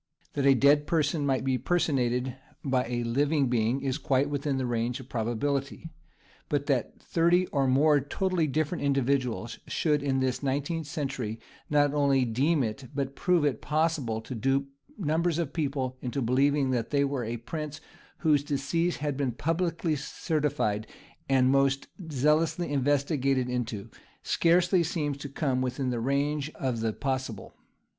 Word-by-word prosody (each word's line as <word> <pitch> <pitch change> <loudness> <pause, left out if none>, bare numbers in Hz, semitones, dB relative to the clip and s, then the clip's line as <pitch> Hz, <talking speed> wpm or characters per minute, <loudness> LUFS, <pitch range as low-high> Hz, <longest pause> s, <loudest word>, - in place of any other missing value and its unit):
That 140 -1 +1
a 135 - +7
dead 145 +3 +4
person 150 -3 +1
might 130 -2 +1
be 130 -1 0
personated 130 -7 0 0.3
by 130 -2 +1
a 120 0 -2
living 140 +3 +1
being 120 +2 +1
is 135 +2 -1
quite 140 0 +1
within 145 -1 -1
the 130 - -1
range 120 +1 -1
of 130 0 -12
probability, 135 +7 -2 0.6
but 145 -2 0
that 135 -6 -1
thirty 175 +2 +2
or 140 -2 +1
more 145 +3 +4
totally 170 +4 0
different 155 +4 -1
individuals 130 -4 0
should 150 -3 +1
in 135 -2 0
this 130 -1 0
nineteenth 145 +3 -2
century 135 -8 -3 0.3
not 145 -1 +3
only 140 -3 +3
deem 135 +6 +2
it, 115 +4 -4
but 140 -1 -2
prove 180 -5 +2
it, 145 - 0
possible 150 -7 0
to 115 - -7
dupe 135 +4 0 0.3
numbers 165 -2 0
of 165 -5 -2
people 135 -5 -2
into 125 +2 -3
believing 135 +2 +2
that 120 -3 -1
they 140 -1 +2
were 135 -3 -2
a 115 +1 -3
prince 150 +5 -6 0.4
whose 150 -4 +3
decease 150 +5 0
had 145 -1 -2
been 135 -2 0
publicly 165 +4 -1
certified 145 - -1 0.4
and 130 -1 +4
most 135 0 +2 0.3
zealously 150 +3 +1
investigated 140 -1 +1
into, 120 -5 -3 0.4
scarcely 175 +2 +3
seems 155 -3 -1
to 145 0 -7
come 135 -2 -1
within 130 0 -1
the 120 - -1
range 140 +4 0
of 125 -4 -2
the 110 0 0
possible. 130 -4 -4
140 Hz, 155 wpm, -28 LUFS, 130-150 Hz, 0.6 s, a